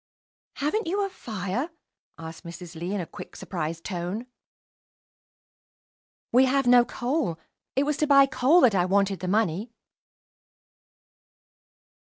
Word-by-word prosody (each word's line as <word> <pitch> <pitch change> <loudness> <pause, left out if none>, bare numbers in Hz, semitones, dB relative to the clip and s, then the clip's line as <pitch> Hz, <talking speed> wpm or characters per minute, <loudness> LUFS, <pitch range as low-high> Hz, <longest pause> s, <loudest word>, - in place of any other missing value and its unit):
"Haven't 325 +10 -1
you 400 +4 0
a - - -4
fire?" 220 - -4 0.5
asked 160 +1 -9
Mrs. 170 0 -9
Lee, 175 +4 -4
in 200 - -1
a - - -4
quick, - - -11
surprised 165 -2 -4
tone. 185 +5 -4 2.1
"We 255 +3 +6
have 270 +1 +2
no 245 0 +7
coal. 245 - -2 0.4
It 275 - +3
was 295 0 -1
to 305 - +1
buy 275 -1 +7
coal 275 +6 +4
that 240 -5 +5
I 180 -2 +2
wanted 195 0 +1
the 185 - -4
money." 210 +2 0
215 Hz, 130 wpm, -26 LUFS, 180-275 Hz, 2.1 s, no